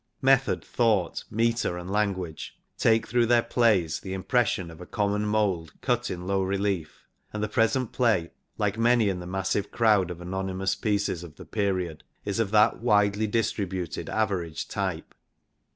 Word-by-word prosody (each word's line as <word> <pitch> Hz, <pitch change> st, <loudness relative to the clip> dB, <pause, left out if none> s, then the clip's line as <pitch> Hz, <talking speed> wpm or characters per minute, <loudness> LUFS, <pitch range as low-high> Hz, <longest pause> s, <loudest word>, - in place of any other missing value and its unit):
Method, 135 Hz, 0 st, +3 dB
thought, 110 Hz, -8 st, +1 dB
metre 115 Hz, -4 st, 0 dB
and 90 Hz, +2 st, -6 dB
language 95 Hz, -6 st, -2 dB, 0.2 s
take 110 Hz, 0 st, +3 dB
through 120 Hz, 0 st, +2 dB
their 120 Hz, 0 st, +4 dB
plays 100 Hz, -10 st, +2 dB
the 95 Hz, -, -6 dB
impression 95 Hz, -3 st, 0 dB
of 80 Hz, +1 st, -13 dB
a 90 Hz, -, -9 dB
common 105 Hz, 0 st, 0 dB
mould 100 Hz, -7 st, -1 dB
cut -, -, 0 dB
in 90 Hz, 0 st, -5 dB
low 95 Hz, 0 st, +1 dB
relief, 95 Hz, -3 st, -2 dB, 0.3 s
and 105 Hz, 0 st, -3 dB
the -, -, 0 dB
present 115 Hz, +2 st, +1 dB
play, 110 Hz, -9 st, +1 dB, 0.3 s
like 105 Hz, +1 st, -1 dB
many 115 Hz, -2 st, +4 dB
in 95 Hz, -2 st, -2 dB
the 90 Hz, -, -7 dB
massive 95 Hz, +2 st, -1 dB
crowd 105 Hz, -6 st, +3 dB
of 90 Hz, -1 st, -6 dB
anonymous 95 Hz, +1 st, -2 dB
pieces 100 Hz, -5 st, -1 dB
of 80 Hz, -3 st, -11 dB
the -, -, -11 dB
period, 95 Hz, -6 st, -2 dB, 0.2 s
is 100 Hz, +2 st, -2 dB
of 110 Hz, -3 st, +1 dB
that 105 Hz, +1 st, +4 dB
widely 105 Hz, -2 st, +3 dB
distri 105 Hz, -2 st, 0 dB
buted 90 Hz, -3 st, -4 dB
average 90 Hz, -7 st, -1 dB
type. -, -, -3 dB
100 Hz, 165 wpm, -26 LUFS, 90-110 Hz, 0.3 s, their